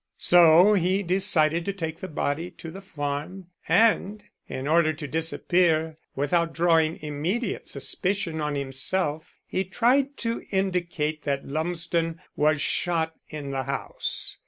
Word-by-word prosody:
So 175 Hz, +3 st, +6 dB
he 190 Hz, +1 st, +1 dB
decided 170 Hz, -3 st, +3 dB
to 200 Hz, -, -2 dB
take 165 Hz, -4 st, -5 dB
the 185 Hz, -, -6 dB
body 160 Hz, +1 st, -2 dB
to 165 Hz, -, -10 dB
the 195 Hz, -, -9 dB
farm, 160 Hz, +2 st, -5 dB, 0.2 s
and 215 Hz, -2 st, +3 dB, 0.2 s
in 130 Hz, +1 st, -5 dB
order 160 Hz, 0 st, +3 dB
to 150 Hz, -1 st, -7 dB
disappear, 160 Hz, 0 st, +1 dB, 0.2 s
without 165 Hz, +4 st, 0 dB
drawing 165 Hz, -1 st, +2 dB
immediate 170 Hz, +10 st, -3 dB
suspicion 165 Hz, +4 st, 0 dB
on 150 Hz, -1 st, -2 dB
himself, 145 Hz, +4 st, -1 dB
he 190 Hz, -, -2 dB
tried 255 Hz, +8 st, +1 dB
to 230 Hz, -1 st, -3 dB
indicate 175 Hz, -6 st, -1 dB
that 140 Hz, -1 st, -1 dB
Lumsden 165 Hz, +2 st, -2 dB, 0.2 s
was 155 Hz, +1 st, +2 dB
shot 165 Hz, -2 st, 0 dB, 0.2 s
in 145 Hz, -3 st, -6 dB
the 135 Hz, -1 st, -3 dB
house. 140 Hz, 0 st, -3 dB
165 Hz, 135 wpm, -25 LUFS, 155-185 Hz, 0.2 s, So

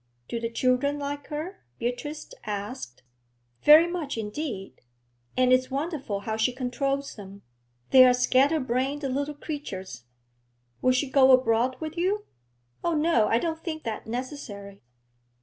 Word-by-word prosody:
'Do 235 Hz, -, -3 dB
the 230 Hz, 0 st, -2 dB
children 255 Hz, +4 st, +1 dB
like 285 Hz, 0 st, -5 dB
her?' 315 Hz, +5 st, -5 dB, 0.2 s
Beatrice 270 Hz, +6 st, -4 dB
asked. 205 Hz, -, -6 dB, 0.6 s
'Very 310 Hz, +3 st, +8 dB
much 345 Hz, -7 st, -4 dB
indeed. 215 Hz, -2 st, -5 dB, 0.6 s
And 255 Hz, 0 st, +4 dB
it's 255 Hz, 0 st, +3 dB
wonderful 275 Hz, -, -3 dB
how 220 Hz, +1 st, -3 dB
she 220 Hz, +3 st, +2 dB
controls 275 Hz, +2 st, -2 dB
them; 200 Hz, -1 st, -11 dB, 0.5 s
they 260 Hz, -1 st, +9 dB
are 255 Hz, -, +7 dB
scatter 265 Hz, +5 st, +3 dB
brained 260 Hz, +3 st, -1 dB
little 280 Hz, +2 st, -2 dB
creatures.' 200 Hz, -, -6 dB, 0.8 s
'Will 255 Hz, -, +4 dB
she 255 Hz, +3 st, +1 dB
go 265 Hz, 0 st, +5 dB
abroad 255 Hz, 0 st, +3 dB
with 315 Hz, +1 st, -6 dB
you?' 395 Hz, +4 st, 0 dB, 0.6 s
'Oh, 340 Hz, -1 st, +1 dB
no, 300 Hz, -8 st, +3 dB
I 225 Hz, -, +3 dB
don't 325 Hz, +4 st, -3 dB
think 315 Hz, -3 st, -4 dB
that 220 Hz, -1 st, -5 dB
necessary.' 225 Hz, -5 st, -6 dB
260 Hz, 140 wpm, -27 LUFS, 230-295 Hz, 0.8 s, they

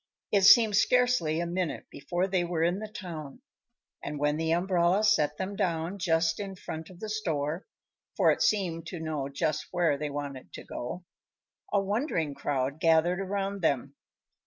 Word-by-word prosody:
It 200 Hz, -, +4 dB
seemed 210 Hz, +2 st, +7 dB
scarcely 245 Hz, -10 st, +3 dB
a 170 Hz, -, -1 dB
minute 175 Hz, -1 st, -2 dB
before 175 Hz, +6 st, -2 dB
they 185 Hz, -2 st, 0 dB
were 170 Hz, -2 st, -1 dB
in 175 Hz, +3 st, +1 dB
the 215 Hz, -, -5 dB
town, 175 Hz, -, -8 dB, 0.6 s
and 145 Hz, +1 st, -4 dB
when 150 Hz, +1 st, +1 dB
the 160 Hz, 0 st, -1 dB
umbrella 175 Hz, +2 st, +2 dB
set 155 Hz, -9 st, +3 dB
them 190 Hz, +2 st, -4 dB
down 170 Hz, +1 st, -1 dB
just 165 Hz, -1 st, +1 dB
in 195 Hz, -2 st, -5 dB
front 160 Hz, -3 st, -7 dB
of 180 Hz, -2 st, -14 dB
the 220 Hz, -, -5 dB
store 165 Hz, -7 st, -2 dB, 0.5 s
for -, -, +5 dB
it -, -, -1 dB
seemed 170 Hz, -6 st, +1 dB
to 175 Hz, -, -6 dB
know 155 Hz, -4 st, -3 dB
just 155 Hz, +1 st, -1 dB
where 170 Hz, -5 st, +1 dB
they 150 Hz, 0 st, -2 dB
wanted 140 Hz, -2 st, -6 dB
to -, -, -8 dB
go 175 Hz, +9 st, -6 dB, 0.7 s
a 200 Hz, -, +3 dB
wondering 195 Hz, -, -1 dB
crowd 140 Hz, +1 st, -2 dB
gathered 165 Hz, +3 st, +3 dB
around 195 Hz, 0 st, -2 dB
them. 140 Hz, -3 st, 0 dB
170 Hz, 170 wpm, -29 LUFS, 155-195 Hz, 0.7 s, seemed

